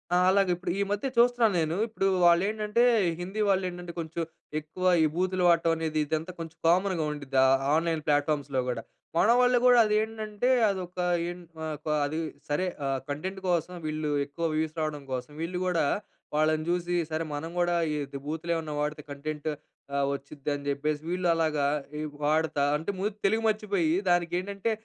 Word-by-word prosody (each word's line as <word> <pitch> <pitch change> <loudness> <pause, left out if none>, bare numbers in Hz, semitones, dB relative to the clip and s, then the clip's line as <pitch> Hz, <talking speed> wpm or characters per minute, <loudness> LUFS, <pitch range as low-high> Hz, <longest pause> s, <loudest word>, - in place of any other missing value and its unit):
ఆ! - - +5
అలాగే 195 -1 +3
ఇప్పుడు 180 0 -3
ఈ - - +2
మధ్య 205 +6 -1
చూస్తున్నాను 240 -2 +4
నేను, 160 0 0
ఇప్పుడు 215 -3 -1 0.2
వాళ్ళు 170 +1 +6
ఏంటంటే, 215 +2 +1 0.4
హిందీ 190 +5 -3
వాళ్ళు 195 -1 +3
ఏంటంటే, 175 -1 -8
కొంచెం 165 +1 -4 0.4
ఎక్కువ 155 +4 -9 0.2
ఈ - - +5
బూతులు 185 +1 0
వాడటం 170 -1 +4
అనేది, 160 -1 -1
ఇదంతా 160 +3 -2
కొంచెం 165 -1 -7
కామన్‌గా 180 -1 +2
ఉండుద్ది 140 -2 -4
ఆ - - +6 0.3
ఆన్లైన్ 165 -1 0
ప్లాట్ఫామ్స్‌లో 145 -2 +1
కూడా. 120 -2 -2 0.4
మన 205 - +4
వాళ్ళు 250 0 +4
గూడా 245 -1 +7
అదెంటంటే, 215 +1 0 0.2
అదొక 185 -2 -4 0.3
ఏంట్ 175 -1 -9 0.2
ఆహ్, 155 - -3
ఒక - - -13 0.2
అది 155 +3 -2 0.3
సరే, 150 +6 +1 0.2
ఆహ్, 135 -1 0
కంటెంట్ 185 +7 -4
కోసం 175 0 0
వీళ్ళు 155 -1 -2
ఎక్కువ 155 +4 -4
వ్యూస్ 155 0 -1
రావడం 150 -2 -3
కోసం, 125 +2 -4
వీళ్ళు 180 +2 -2
గూడా 175 -4 +2 0.5
వాళ్ళని 155 0 +2
చూసి, 175 0 0 0.2
సరే 155 +1 -1
మనం 160 +3 -5
కూడా 175 0 +2 0.2
ఈ - - -1 0.2
ద్ - - -3
బూతులు 160 +2 -3
ఏమన్నా 160 -2 -3
వాడితే 150 +1 -2
కంటెంట్ 150 +2 -4 0.5
ఆహ్, 140 0 +2
వచ్చిద్ది 140 +1 -7
అని 140 0 -8
చెప్పేసి 150 +1 -1
వీళ్ళు 180 0 0
అలాగా 155 -3 +1 0.3
ఈ - - -2 0.2
వాడతా 155 -1 +2
అంటే, 160 +6 -3
ముందు 205 +1 -1
తెలుగు 220 +3 +1
మర్చిపోయి, 200 -7 0 0.2
దానికి 175 -1 +2
ఏంటంటే, 200 +3 -2
170 Hz, 175 wpm, -28 LUFS, 155-190 Hz, 0.5 s, గూడా